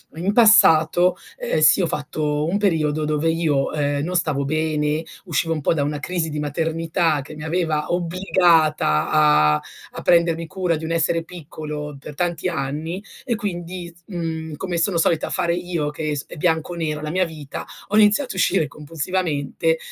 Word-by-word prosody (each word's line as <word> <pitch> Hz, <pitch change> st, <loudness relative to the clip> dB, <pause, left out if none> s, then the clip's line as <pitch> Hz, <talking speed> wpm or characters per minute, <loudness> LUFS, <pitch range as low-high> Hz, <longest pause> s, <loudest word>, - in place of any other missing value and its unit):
in 185 Hz, +5 st, -1 dB
passato, 180 Hz, -6 st, +6 dB, 0.2 s
ehm, 155 Hz, -, -1 dB
sì, 155 Hz, +5 st, +7 dB
ho 170 Hz, -, +1 dB
fatto 150 Hz, 0 st, -2 dB
un 195 Hz, +4 st, 0 dB
periodo 160 Hz, -7 st, +1 dB
dove 155 Hz, +2 st, 0 dB
io, 155 Hz, -5 st, 0 dB
ehm, 145 Hz, -1 st, -1 dB
non 180 Hz, +2 st, -3 dB
stavo 150 Hz, -5 st, +2 dB
bene, 155 Hz, 0 st, -1 dB, 0.2 s
uscivo 165 Hz, -1 st, 0 dB
un 155 Hz, -, -4 dB
po' -, -, +1 dB
da 145 Hz, -3 st, 0 dB
una 145 Hz, 0 st, -3 dB
crisi 170 Hz, 0 st, -2 dB
di 150 Hz, 0 st, -4 dB
maternità 160 Hz, +1 st, -1 dB
che 145 Hz, +3 st, -11 dB
mi 150 Hz, -, -9 dB
aveva 160 Hz, -2 st, -1 dB
obbligata 170 Hz, -, +2 dB
a 150 Hz, -, +4 dB, 0.4 s
a -, -, -4 dB
prendermi 170 Hz, -1 st, +2 dB
cura 185 Hz, -2 st, -1 dB
di 160 Hz, -, -9 dB
un 165 Hz, -, -4 dB
essere 165 Hz, 0 st, +2 dB
piccolo 150 Hz, -3 st, -8 dB
per 150 Hz, -, -10 dB
tanti 175 Hz, +1 st, -1 dB
anni, 160 Hz, +5 st, -4 dB, 0.2 s
e 235 Hz, -, 0 dB
quindi, 175 Hz, -3 st, -6 dB
s 170 Hz, -, -24 dB
mhmm, 160 Hz, -4 st, -5 dB
come 175 Hz, +1 st, -4 dB
sono 170 Hz, +1 st, +3 dB
solita 165 Hz, -1 st, +1 dB
fare 170 Hz, 0 st, +1 dB
io, 175 Hz, -4 st, -3 dB
che 150 Hz, 0 st, -4 dB
è -, -, -1 dB
sp 140 Hz, -, -6 dB
è -, -, -8 dB
bianco 160 Hz, +1 st, 0 dB
o -, -, -7 dB
nero 155 Hz, -2 st, -3 dB
la 155 Hz, -, -4 dB
mia 185 Hz, +2 st, +1 dB
vita, 155 Hz, -4 st, -8 dB, 0.2 s
ho 210 Hz, -, +1 dB
iniziato 215 Hz, +5 st, +4 dB
a -, -, -13 dB
uscire 160 Hz, -3 st, +2 dB
compulsivamente 160 Hz, -, -2 dB
160 Hz, 185 wpm, -21 LUFS, 150-175 Hz, 0.4 s, sì